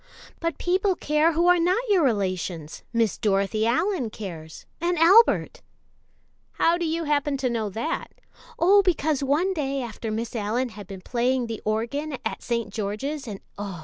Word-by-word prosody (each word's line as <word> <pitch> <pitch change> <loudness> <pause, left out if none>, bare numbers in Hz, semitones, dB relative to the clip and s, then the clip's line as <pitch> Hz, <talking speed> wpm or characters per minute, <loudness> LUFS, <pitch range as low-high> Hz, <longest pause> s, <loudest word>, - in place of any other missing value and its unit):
"But 335 0 -2
people 375 +2 +1
care 305 +1 +2
who 335 +2 +2
are 355 0 +5
not 370 +9 +1
your 390 -6 +4
relations 185 - -2
Miss 230 -3 +1
Dorothy 205 +2 +1
Allyn 325 - +1
cares, 165 -7 -8 0.2
and 350 +1 0
Albert." 420 +8 +5 0.9
"How 335 - +3
do 345 -1 -2
you 330 +1 -1
happen 290 -2 0
to 260 -2 -1
know 220 -3 -1
that." 230 - -3 0.5
"Oh, 395 +4 +6
because 315 -6 +1
one 310 +8 +1
day 275 -5 -2
after 230 -2 -5
Miss 225 +2 -3
Allyn 230 +4 -1
had 205 -4 -10
been 195 -2 -8
playing 245 +3 0
the 230 -2 -6
organ 235 +8 -2
in 265 - -3
St. 230 -4 -3
George's 235 +8 -3
and 200 -3 -6 0.2
oh! 195 -4 -5
260 Hz, 165 wpm, -25 LUFS, 215-335 Hz, 0.9 s, Oh